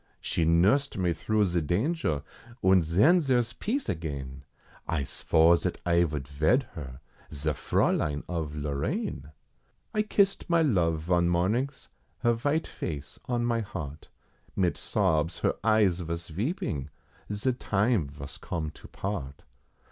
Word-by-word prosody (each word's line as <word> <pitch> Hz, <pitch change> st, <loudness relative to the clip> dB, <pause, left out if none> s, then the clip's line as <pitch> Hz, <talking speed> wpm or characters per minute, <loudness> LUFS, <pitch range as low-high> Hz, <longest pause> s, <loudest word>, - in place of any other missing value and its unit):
She 80 Hz, -, 0 dB
nursed 100 Hz, -, +3 dB
me 90 Hz, -3 st, +1 dB
through 105 Hz, +6 st, +1 dB
ze 85 Hz, -2 st, 0 dB
danger, 90 Hz, -, 0 dB, 0.4 s
und 95 Hz, -1 st, +5 dB
ven 120 Hz, -, +4 dB
zere's 120 Hz, -5 st, +1 dB
peace 245 Hz, -, -2 dB
again, 70 Hz, -5 st, -4 dB, 0.4 s
I 80 Hz, -4 st, 0 dB
svore 80 Hz, +4 st, +4 dB
zat -, -, -2 dB
I 85 Hz, 0 st, +4 dB
vould 75 Hz, -4 st, -4 dB
ved 80 Hz, -, +2 dB
her, 65 Hz, -5 st, -8 dB, 0.3 s
ze 75 Hz, +1 st, -1 dB
Fraulein 75 Hz, +1 st, +1 dB
of 80 Hz, -4 st, -3 dB
Lorraine. 75 Hz, -, -3 dB, 0.6 s
I 215 Hz, -, +2 dB
kissed 200 Hz, -3 st, +1 dB
my 170 Hz, -1 st, +4 dB
love 85 Hz, -, +2 dB
von 85 Hz, +1 st, +2 dB
mornings, 110 Hz, +11 st, 0 dB, 0.3 s
her 120 Hz, -2 st, +4 dB
vite 145 Hz, +7 st, 0 dB
face 75 Hz, -4 st, -6 dB
on 120 Hz, -1 st, 0 dB
my 120 Hz, -1 st, +1 dB
heart, 80 Hz, -8 st, -6 dB, 0.5 s
Mit 90 Hz, -3 st, +1 dB
sobs 80 Hz, +2 st, +1 dB
her -, -, +2 dB
eyes 105 Hz, -5 st, +3 dB
vos 85 Hz, 0 st, -4 dB
veeping, 105 Hz, -, -2 dB, 0.4 s
ze 105 Hz, +6 st, 0 dB
time 105 Hz, -, +1 dB
vos 70 Hz, -1 st, -9 dB
come 80 Hz, -3 st, -3 dB
to -, -, -14 dB
part. 70 Hz, -9 st, -5 dB
85 Hz, 140 wpm, -28 LUFS, 75-120 Hz, 0.6 s, und